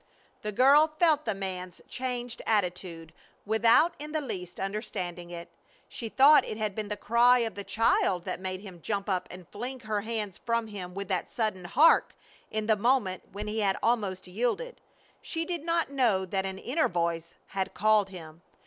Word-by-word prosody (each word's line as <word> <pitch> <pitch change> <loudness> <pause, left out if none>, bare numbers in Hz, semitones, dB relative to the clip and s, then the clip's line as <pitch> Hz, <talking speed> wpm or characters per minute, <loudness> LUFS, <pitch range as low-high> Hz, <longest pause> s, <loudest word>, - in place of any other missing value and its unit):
The 210 - -3
girl 280 +8 +5
felt 310 -3 +3
the 220 -3 -1
man's 185 -2 -5
changed 245 -2 -4
attitude 180 -5 -1 0.3
without 230 +10 +4
in 300 +1 -7
the 310 - +1
least 185 - -6
understanding 185 -4 -4
it. 170 -1 -7 0.4
She 230 - -6
thought 285 +6 +7
it 215 - -5
had 215 -2 -2
been 215 +1 -4
the 210 0 -4
cry 240 +2 +5
of 225 - -4
the 200 - -6
child 195 -5 +1
that - - -3
made 185 0 -4
him 185 -4 -11
jump 200 +1 -2
up 185 -3 -1
and 180 -2 -11
fling 245 +4 -6
her 215 -2 -2
hands 215 -3 -4
from 230 -1 0
him 190 -4 -7
with 200 -1 -4
that 185 -2 -1
sudden 215 -6 -2
"Hark!" 290 - +4 0.3
in 215 0 -2
the 220 0 +4
moment 210 -4 0
when 205 +2 -6
he 215 +1 -2
had 195 -2 +1
almost 205 -6 0
yielded. 245 - -2 0.4
She 330 -1 -3
did 345 -3 -3
not 335 -3 0
know 230 -9 +2
that 190 +1 -2
an 190 0 -5
inner 280 +10 0
voice 170 -1 -2
had 190 -1 -3
called 210 -1 +3
him. 165 -3 -11
210 Hz, 185 wpm, -28 LUFS, 185-245 Hz, 0.4 s, thought